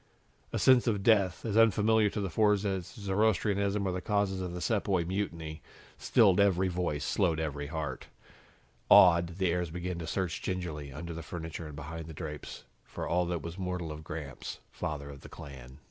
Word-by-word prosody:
A - - -1
sense 130 -1 +5
of 105 -4 +1
death, 100 -5 +3
as 105 -2 -1
unfamiliar 110 -1 +4
to 105 - -3
the 95 -3 -3
Fords 105 +1 +3
as 95 -3 -2
Zoroastrianism 100 -1 0
or - - 0
the 90 0 -3
causes 100 -2 0
of 90 -1 -4
the 90 - -5
Sepoy 95 -3 +1
Mutiny, 85 -4 -3 0.4
stilled 100 -7 +4
every 95 -2 +3
voice, 85 -5 -2
slowed 85 -6 +1
every 75 -2 -3
heart. 75 -4 -4 0.8
Awed, 85 -1 +7
the 95 -3 +2
heirs 90 -1 -1
began 90 +1 -4
to 80 - -5
search 90 -1 -2
gingerly, 80 -6 -4
under 85 +5 -6
the 85 - -6
furniture 80 0 -6
and 75 - -9
behind 80 +2 -7
the 80 - -9
drapes, 75 -2 -7 0.2
for - - -6
all 90 0 +1
that 85 -4 -2
was 85 +3 -7
mortal 90 -3 -3
of 75 +1 -8
Gramps, 75 -3 -6
father 70 -2 -4
of 70 -1 -12
the - - -11
clan. 65 -2 -11
90 Hz, 185 wpm, -30 LUFS, 80-100 Hz, 0.8 s, Awed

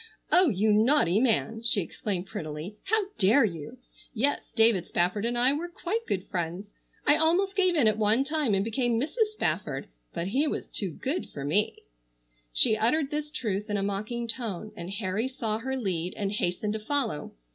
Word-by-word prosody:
"Oh, 360 -2 +5
you 210 0 +2
naughty 215 - +4
man!" 225 -2 +1
she 230 -3 +2
exclaimed 185 +1 -3
prettily. 165 -2 -6
"How 435 0 +2
dare 225 +7 +5
you! 170 +5 -6 0.4
Yes, 275 +6 +1
David 225 -6 +4
Spafford 180 +5 +1
and 240 0 -1
I 250 +3 +5
were 320 +4 -3
quite 405 +6 -3
good 190 0 -2
friends. 180 +3 -4 0.3
I 295 - +5
almost 365 +5 +2
gave 370 -3 +3
in 280 -8 +4
at 215 0 +2
one 220 +5 +3
time 295 -7 +1
and 195 +1 0
became 235 0 0
Mrs. 370 - +1
Spafford, 155 - -2 0.2
but 170 +3 -3
he 275 +8 +2
was - - -3
too 195 - -2
good 270 - -3
for 140 - -6
me!" 185 +9 0 0.7
She - - +4
uttered 265 +7 +1
this 300 0 -3
truth 210 -7 -3
in 205 - 0
a 195 - -1
mocking 215 +4 -3
tone, 215 -4 -4
and 170 +1 -7
Harry 200 +3 -2
saw 225 -5 -3
her 265 +3 -3
lead 185 -6 -2
and 200 -2 -1
hastened 205 +1 -1
to 220 - -3
follow. 225 - -2
220 Hz, 185 wpm, -28 LUFS, 195-270 Hz, 0.7 s, Oh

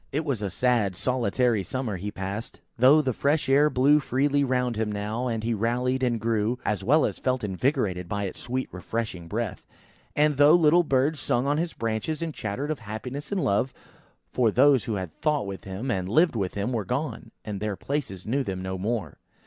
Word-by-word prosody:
It 150 +3 -1
was 135 -8 -1
a 100 - -1
sad, 115 -5 +1
solitary 120 -1 +1
summer 125 -2 -3
he 100 +4 -4
passed, 100 +4 -6 0.2
though 135 +5 +6
the 130 -2 0
fresh 145 +6 +1
air 145 +3 +5
blew 145 +3 +4
freely 140 +1 +1
round 125 -2 0
him 110 -1 -1
now, 105 +4 -2
and 115 -2 -2
he 115 +1 0
rallied 125 +4 0
and 120 -3 +1
grew, 115 +1 0
as 105 -2 -1
well 150 +9 +4
as - - -3
felt 130 -2 -1
invigorated 100 - -1
by 100 +1 -2
its 95 - -5
sweet 130 +2 -3
refreshing 90 -2 -4
breath; 110 +2 -4 0.5
and 150 -1 +3
though 145 +2 +7
the 170 - -1
little 170 +4 +6
birds 140 +1 +1
sung 125 -1 0
on 145 +2 +1
his 170 0 -2
branches 115 +9 -2
and 160 -2 -3
chattered 130 +8 -3
of 155 - -3
happiness 125 - -6
and 195 -3 0
love: 110 +6 +1 0.6
for 120 -3 +3
those 135 +3 +4
who 115 - -2
had 95 -5 -5
thought 150 -6 +1
with 100 -1 -7
him 100 +7 -4
and 95 -4 -2
lived 160 - +3
with 95 -4 -2
him, 100 +4 -1
were 110 -3 -1
gone, 125 +2 -3 0.2
and 105 -2 -4
their 105 -1 -2
places 120 -8 -4
knew 135 +5 0
them 95 -5 -4
no 95 0 -4
more. 105 - -3
120 Hz, 205 wpm, -26 LUFS, 105-140 Hz, 0.6 s, though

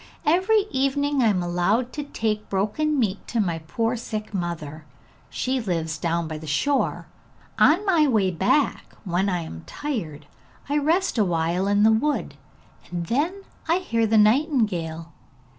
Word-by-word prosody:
Every 375 +7 +3
evening 275 +1 +1
I 235 - +4
am 190 -4 +1
allowed 185 +8 0
to 295 - -4
take 215 -6 -3
broken 215 +11 0
meat 210 -6 -1
to 235 - -2
my 175 -6 0
poor 225 +9 -2
sick 215 -2 -5
mother: 165 -4 -4 0.5
she 260 0 -1
lives 165 -6 -2
down 170 0 -1
by 155 -1 -5
the 155 - -10
shore. 265 - 0 0.5
On 350 +7 +5
my 335 -6 +4
way 210 -7 +2
back, 190 - 0
when 190 0 0
I 180 -2 -1
am 80 - -8
tired, 160 - -5 0.4
I 290 +1 +1
rest 320 -2 +1
awhile 175 -1 +1
in 205 +1 +3
the 220 - +6
wood, 290 +7 0 0.6
and 175 -1 -3
then 325 - -1 0.3
I 335 - +4
hear 230 -11 0
the 220 +1 +3
nightingale. 210 - +1
215 Hz, 155 wpm, -24 LUFS, 175-285 Hz, 0.6 s, the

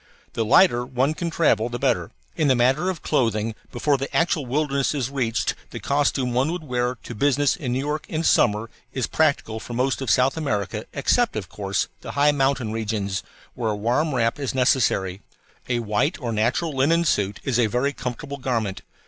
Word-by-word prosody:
The 115 - 0
lighter 120 - +5
one 130 +4 0
can 170 +2 -3
travel 150 -8 +2
the 120 - -4
better. - - 0 0.3
In 155 - +1
the 130 - +4
matter 135 +9 +2
of 180 -4 -4
clothing, 115 -6 +1 0.2
before 140 +4 +1
the 135 - -4
actual 165 -5 +1
wilderness 140 0 0
is 135 -2 -2
reached 125 -5 0 0.2
the - - -7
costume 140 -3 0
one 130 +6 +1
would 175 -1 -4
wear 125 -2 -1
to - - -7
business 140 +4 +2
in 145 -10 -4
New - - 0
York 150 +3 -3
in 160 0 -2
summer 115 -6 +2 0.2
is 130 -3 -1
practical 140 -8 0
for 120 - -8
most 130 +3 0
of 135 - -2
South 130 +5 +3
America, 110 -7 -2
except, 235 - +1
of 100 -5 -4
course, 100 0 -2
the - - -7
high 145 +1 +4
mountain 135 -5 0
regions, 105 -3 -2 0.3
where 115 -3 -2
a 105 - 0
warm 125 +8 0
wrap 115 +2 +1
is 135 -2 -3
necessary. 110 -7 +2 0.5
A 120 - +1
white 115 - 0
or 120 -5 -3
natural 120 +9 0
linen 165 +6 +3
suit 100 -8 0
is 125 -3 0
a 115 - +4
very 125 +6 0
comfortable 130 +2 -5
garment. 115 -7 -2
125 Hz, 190 wpm, -23 LUFS, 115-145 Hz, 0.5 s, lighter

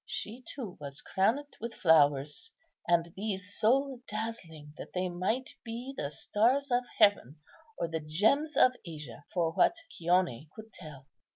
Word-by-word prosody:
She, 235 +5 -5
too, 230 -10 -7
was 140 -1 -6
crowned 250 +10 0
with 230 +1 -5
flowers, 150 - +3 0.4
and 170 -1 +2
these 200 -1 -4
so 265 +3 +2
dazzling 175 -9 -6
that - - -10
they 185 0 -1
might 195 +9 -1
be 240 +3 -6
the 140 - -3
stars 245 - +1
of 245 0 +4 0.2
heaven 200 - +3 0.4
or 170 - -1
the 165 0 -3
gems 220 - +1
of 255 - +7
Asia 150 -3 -9
for 170 -3 +1
what 255 - +3 0.2
Chione 170 - +1
could 220 0 -11
tell. 145 -4 -11
190 Hz, 150 wpm, -31 LUFS, 160-235 Hz, 0.4 s, of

